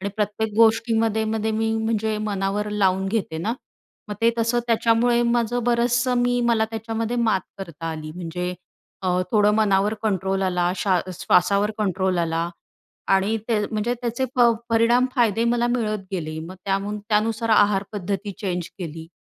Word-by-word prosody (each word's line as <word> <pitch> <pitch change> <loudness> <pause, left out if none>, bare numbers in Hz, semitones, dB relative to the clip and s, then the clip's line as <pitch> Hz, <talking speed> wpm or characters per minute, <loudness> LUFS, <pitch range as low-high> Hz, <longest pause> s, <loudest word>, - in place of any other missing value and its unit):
आणि 200 - -2
प्रत्येक 210 +1 -1
गोष्टीमध्ये 225 -1 +3
मध्ये 220 0 -1
मी 225 0 0
म्हणजे 220 -1 -1
मनावर 205 0 -2
लावून 190 -2 +1
घेते 195 -7 -2
ना. 215 +7 -1 0.6
मग 210 - -4
ते 230 0 +4
तसं 230 +1 +1
त्याच्यामुळे 235 +1 +3
माझं 240 0 +1
बरंचसं 240 +1 +2
मी 245 0 +1
मला 225 -2 +3
त्याच्यामध्ये 225 +1 -3
मात 225 -5 +2 0.2
करता 165 -4 -7
आली. 155 -1 -6
म्हणजे 180 +1 -4 0.5
अ, - - +1 0.2
थोडं 210 -1 +4
मनावर 210 0 +2
कंट्रोल 195 -2 0
आला. 180 -1 +1
शा 185 -3 +2 0.2
श्वासावर 200 +3 +3
कंट्रोल 190 -3 0
आला 165 0 0 0.7
आणि 200 +4 +1
ते 225 -2 +2
म्हणजे 220 +3 -1
त्याचे 240 +1 -1
प 250 - 0 0.3
परिणाम 235 +2 +3
फायदे 230 -2 +2
मला 240 0 +2
मिळत 215 -2 -1
गेले. 155 -3 -4
मग 175 +4 -8
त्यामून 200 +2 -1
त्यानुसार 225 +2 +1
आहारपद्धती 205 -1 +1
चेंज 180 -5 -3
केली 160 -2 -7
210 Hz, 150 wpm, -23 LUFS, 190-230 Hz, 0.7 s, ते